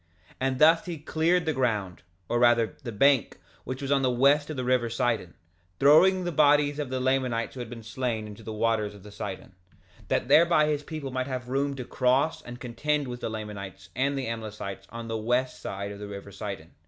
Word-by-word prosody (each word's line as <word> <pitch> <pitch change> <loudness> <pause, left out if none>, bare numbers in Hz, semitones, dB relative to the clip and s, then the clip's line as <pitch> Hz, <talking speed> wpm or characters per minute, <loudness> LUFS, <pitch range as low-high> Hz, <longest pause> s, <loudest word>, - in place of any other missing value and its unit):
2:34 - - -24
And 130 0 0
thus 160 +3 +5
he 170 -2 -4
cleared 165 +3 +1
the 160 - +1
ground, 105 - -1 0.3
or 120 - 0
rather 120 -2 +4
the 120 - -5
bank, 135 +4 +3 0.3
which 130 +2 -5
was 135 - -2
on 140 -1 +3
the 130 - +2
west 140 +4 +3
of 155 - -5
the 130 - -2
river 125 -2 +2
Sidon, 115 -7 -1 0.4
throwing 180 +7 +6
the 175 - -2
bodies 145 -1 +4
of 145 -3 -3
the 130 0 -2
Lamanites 130 -3 0
who 130 - -9
had 120 -2 -5
been 115 -1 -9
slain 115 -1 -3
into 105 +1 -10
the 110 - -7
waters 110 -1 0
of 100 +1 -13
Sidon, 95 -2 -6 0.5
that - - 0
thereby 165 -1 +5
his 150 -1 0
people 145 -3 -6
might 130 0 -2
have 125 -2 -5
room 140 +1 0
to 125 -2 -6
cross 130 +6 +1
and 120 0 -9
contend 140 +4 -1
with 125 0 -6
the - - -2
Lamanites 100 -4 -7
and 140 +3 0
the 135 - -2
Amlicites 110 -3 -6
on 115 0 -7
the 115 0 -2
west 125 +4 0
side 100 +1 -5
of 100 - -9
the 105 - -6
river 100 0 -8
Sidon. 100 -5 -7
125 Hz, 215 wpm, -27 LUFS, 110-140 Hz, 0.5 s, throwing